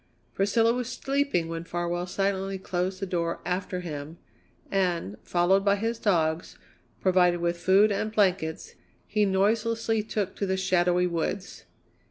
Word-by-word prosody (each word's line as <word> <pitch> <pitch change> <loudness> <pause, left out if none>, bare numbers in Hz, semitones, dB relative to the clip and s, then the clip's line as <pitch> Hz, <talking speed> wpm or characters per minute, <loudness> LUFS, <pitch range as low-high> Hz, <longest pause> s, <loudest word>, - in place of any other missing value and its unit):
Priscilla 225 +4 +2
was 250 -1 -3
sleeping 275 -11 0
when 165 0 -4
Farwell 175 +1 -3
silently 195 0 -1
closed 185 0 -2
the 195 - -2
door 170 -2 -2
after 180 0 -2
him, 155 -1 -6 0.5
and, 175 - 0
followed 180 +3 +2
by 200 0 +4
his 225 +3 -2
dogs, 165 -5 0 0.4
provided 180 -2 +3
with 170 0 0
food 195 +4 +4
and 210 +2 -1
blankets, 185 -6 0 0.3
he 210 -1 +1
noiselessly 225 +3 +1
took 205 -2 -3
to 200 - -1
the 190 0 0
shadowy 180 -1 +2
woods. 180 +3 -3
190 Hz, 140 wpm, -27 LUFS, 175-205 Hz, 0.5 s, by